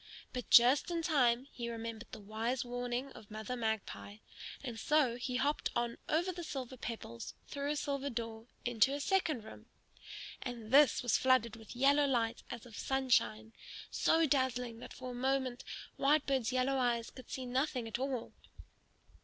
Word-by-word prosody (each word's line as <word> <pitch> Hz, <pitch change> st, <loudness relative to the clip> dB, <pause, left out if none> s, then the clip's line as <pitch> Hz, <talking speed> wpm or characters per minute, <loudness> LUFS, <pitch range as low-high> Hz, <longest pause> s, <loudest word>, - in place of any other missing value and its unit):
But 250 Hz, -2 st, -5 dB
just 250 Hz, +7 st, +7 dB
in 335 Hz, -1 st, -1 dB
time 255 Hz, -6 st, +3 dB
he 235 Hz, -1 st, -5 dB
remembered 230 Hz, -1 st, -6 dB
the -, -, -7 dB
wise 225 Hz, +5 st, -2 dB
warning 245 Hz, +2 st, -3 dB
of 215 Hz, -, -13 dB
Mother 215 Hz, +3 st, -4 dB
Magpie; 220 Hz, -3 st, -3 dB, 0.5 s
and 240 Hz, -4 st, -5 dB
so 290 Hz, -3 st, +3 dB
he 250 Hz, +1 st, -3 dB
hopped 285 Hz, +4 st, +1 dB
on 240 Hz, -1 st, -1 dB
over 345 Hz, +4 st, +2 dB
the 350 Hz, -1 st, -6 dB
silver 260 Hz, -5 st, -5 dB
pebbles 225 Hz, -, -6 dB
through 280 Hz, 0 st, -3 dB
a 300 Hz, -, +1 dB
silver 280 Hz, -1 st, -2 dB
door 230 Hz, -2 st, -5 dB, 0.2 s
into 240 Hz, +3 st, +3 dB
a -, -, -3 dB
second 310 Hz, -, +1 dB
room. 220 Hz, -, -12 dB, 0.7 s
And 235 Hz, -3 st, -6 dB
this 285 Hz, -1 st, +6 dB
was 245 Hz, -3 st, +3 dB
flooded 255 Hz, -4 st, +3 dB
with 225 Hz, 0 st, -11 dB
yellow 280 Hz, +3 st, +4 dB
light 235 Hz, -3 st, 0 dB
as 240 Hz, -1 st, -7 dB
of 230 Hz, -3 st, -12 dB
sunshine, 245 Hz, -4 st, +1 dB, 0.4 s
so 325 Hz, 0 st, +3 dB
dazzling 250 Hz, -4 st, 0 dB
that -, -, -9 dB
for 255 Hz, -1 st, -7 dB
a -, -, -6 dB
moment 260 Hz, 0 st, 0 dB, 0.3 s
Whitebird's 275 Hz, -4 st, +2 dB
yellow 260 Hz, +1 st, +1 dB
eyes 235 Hz, -2 st, 0 dB
could 255 Hz, -2 st, -12 dB
see 260 Hz, -, -4 dB
nothing 255 Hz, -1 st, -1 dB
at 225 Hz, +2 st, -3 dB
all. 265 Hz, -3 st, -3 dB
250 Hz, 165 wpm, -34 LUFS, 230-275 Hz, 0.7 s, just